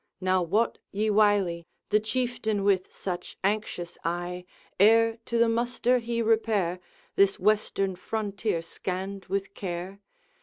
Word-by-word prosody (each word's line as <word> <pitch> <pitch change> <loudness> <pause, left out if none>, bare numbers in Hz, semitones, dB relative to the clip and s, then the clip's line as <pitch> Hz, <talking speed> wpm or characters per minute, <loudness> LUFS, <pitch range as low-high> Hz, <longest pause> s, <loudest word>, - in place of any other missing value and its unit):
Now 185 0 +2
wot 205 +7 +1
ye 215 +2 0
wily 200 -5 +3 0.2
The 210 - +5
Chieftain 220 -2 -1
with 195 -2 +2
such 180 -2 -5
anxious 195 -4 -2
eye, 175 +1 -3 0.3
Ere 225 +2 +5
to 235 - -1
the 235 0 +5
muster 240 +2 +1
he 235 0 -2
repair, 215 -5 +1 0.4
This 200 0 +4
western 195 -1 +1
frontier 205 -2 -2
scanned 190 +3 -5
with 195 +1 -2
care? 185 +1 -5
200 Hz, 125 wpm, -27 LUFS, 185-220 Hz, 0.4 s, The